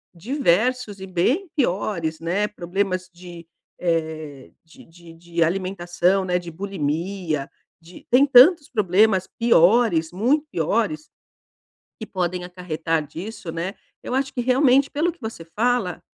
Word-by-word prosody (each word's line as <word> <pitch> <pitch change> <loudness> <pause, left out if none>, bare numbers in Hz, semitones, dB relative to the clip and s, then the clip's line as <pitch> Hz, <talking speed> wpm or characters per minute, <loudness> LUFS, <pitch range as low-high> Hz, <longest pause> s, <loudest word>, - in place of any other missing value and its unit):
diversos 220 - 0
e 190 - -7
bem 245 - 0
piores, 175 - -1
né? 185 +5 0
Problemas 185 -1 -3
de, 175 -1 -11 0.3
eh, 155 -5 -3
de 160 - -17
de 170 0 -16
de 170 0 -2
alimentação, 185 +1 0
né, 180 -1 0
de 175 -1 -9
bulimia, 165 -3 -3 0.3
de 170 +2 -15
tem 255 +3 +5
tantos 285 +4 +6
problemas 195 -2 +2
piores, 200 -6 +3
muito 260 +11 +1
piores, 230 - -1 0.9
que 220 - -7
podem 180 -2 -2
acarretar 165 -3 -3
disso, 185 +3 -8
né? 170 +4 -4 0.3
Eu 250 - -4
acho 270 0 -1
que 245 - -2
realmente, 260 +2 +3
pelo 320 +5 0
que 345 - -23
você 220 -7 -7
fala, 220 +1 -1
185 Hz, 130 wpm, -22 LUFS, 170-235 Hz, 0.9 s, tantos